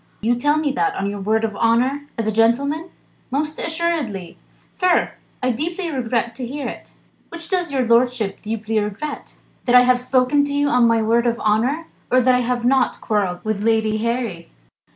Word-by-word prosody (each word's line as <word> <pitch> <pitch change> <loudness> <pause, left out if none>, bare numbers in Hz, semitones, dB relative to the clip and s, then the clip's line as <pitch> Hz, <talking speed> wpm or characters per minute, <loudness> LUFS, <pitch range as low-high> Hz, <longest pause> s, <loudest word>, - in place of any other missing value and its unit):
"You 230 +3 +1
tell 290 +5 +1
me 305 -2 0
that, 405 +8 0
on 200 +1 -2
your 205 - -5
word 220 +3 0
of 215 -2 -2
honour 255 +6 +1
as 225 - -1
a 220 - +1
gentleman?" 280 - +1 0.4
"Most 300 +3 -2
assuredly!" 320 - -2 0.4
"Sir! 365 -1 +2 0.3
I 255 - +2
deeply 335 +7 -3
regret 235 -3 -1
to 250 - -4
hear 280 +3 -4
it." - - -9 0.4
"Which 335 0 -7
does 360 -5 -1
your 265 -2 +1
lordship 235 -3 +1
deeply 220 0 -2
regret? 210 +9 -5 0.3
That 245 - +3
I 250 - +9
have 250 0 +3
spoken 255 +3 +2
to 285 - -4
you 285 0 +2
on 245 -3 +4
my 230 -1 +2
word 235 +2 +2
of 235 0 0
honour, 245 +10 +1 0.3
or 255 - +5
that 255 0 +4
I 250 - +3
have 245 0 -1
not 260 0 +2
quarrelled 195 -5 -1
with 215 -2 -1
Lady 220 -1 +2
Harry?" 230 -7 -3
245 Hz, 190 wpm, -21 LUFS, 225-285 Hz, 0.4 s, I